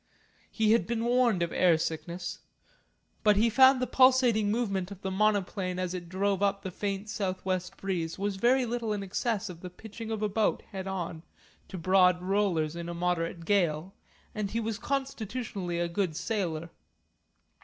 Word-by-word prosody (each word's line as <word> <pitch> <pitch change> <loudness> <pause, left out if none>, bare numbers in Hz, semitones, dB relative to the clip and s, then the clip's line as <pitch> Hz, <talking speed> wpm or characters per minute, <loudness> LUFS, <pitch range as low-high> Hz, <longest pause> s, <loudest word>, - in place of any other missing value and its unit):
He 220 -2 +2
had 230 - +3
been 230 0 -1
warned 240 -6 +3
of 170 - -2
air 175 -3 +4
sickness. 170 +3 -4 0.8
But 210 -1 +5
he 225 +3 +3
found 265 +2 +7
the 255 - +1
pulsating 250 -4 +4
movement 200 -5 -1
of 200 -1 -11
the 190 - -2
monoplane 195 -2 0
as 185 -1 -2
it 175 -2 -6
drove 195 +1 0
up 200 0 +1
the 190 - -4
faint 200 +2 -3
south 195 -4 -3
west 185 -1 -2
breeze 175 -4 -3
was 200 0 -2
very 250 +5 +3
little 230 -2 -2
in 205 -1 -3
excess 215 +2 -1
of 175 -3 -9
the 180 - -6
pitching 220 +4 -9
of 220 -1 -2
a - - +3
boat 210 +1 0
head 190 -1 -5
on 175 -4 -4 0.5
to 190 - -7
broad 180 +1 +4
rollers 180 -5 0
in 170 0 -5
a 170 - -5
moderate 170 -1 -1
gale, 180 -3 +1 0.4
and 210 -2 -2
he 225 - -1
was 225 -1 -3
constitutionally 230 -9 -3
a 175 - +1
good 170 -2 -1
sailor. 170 -5 -2
195 Hz, 175 wpm, -29 LUFS, 180-220 Hz, 0.8 s, found